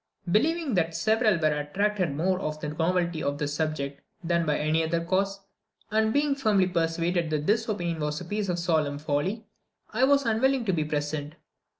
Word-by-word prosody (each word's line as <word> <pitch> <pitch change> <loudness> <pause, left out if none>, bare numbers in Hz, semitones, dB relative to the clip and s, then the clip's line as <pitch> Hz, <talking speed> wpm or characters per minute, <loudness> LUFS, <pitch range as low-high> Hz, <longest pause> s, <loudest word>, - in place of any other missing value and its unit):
Believing 310 - +2
that 165 -3 +1
several 215 +3 +2
were 155 -2 +2
attracted 185 +1 -1
more 180 +4 +1
by 155 -5 -2
the 150 - -4
novelty 170 +1 0
of 140 0 -1
the 150 -1 -1
subject 145 -2 -3 0.2
than 170 -1 +1
by 150 - +2
any 155 +2 +1
other 165 +1 -1
cause, 195 +2 0 0.5
and 220 0 +2
being 285 +2 +2
firmly 215 -8 +2
persuaded 170 -1 0
that 150 -1 -1
this 220 +4 +2
opinion 175 -5 -2
was 150 0 -2
a 180 - -8
piece 205 +2 -2
of 175 - 0
solemn 155 -5 0
folly, 155 +9 -2 0.5
I 245 +4 +4
was 280 0 +3
unwilling 240 +3 +2
to 190 - +1
be 155 -3 0
present. 150 0 -3
170 Hz, 185 wpm, -27 LUFS, 155-210 Hz, 0.5 s, I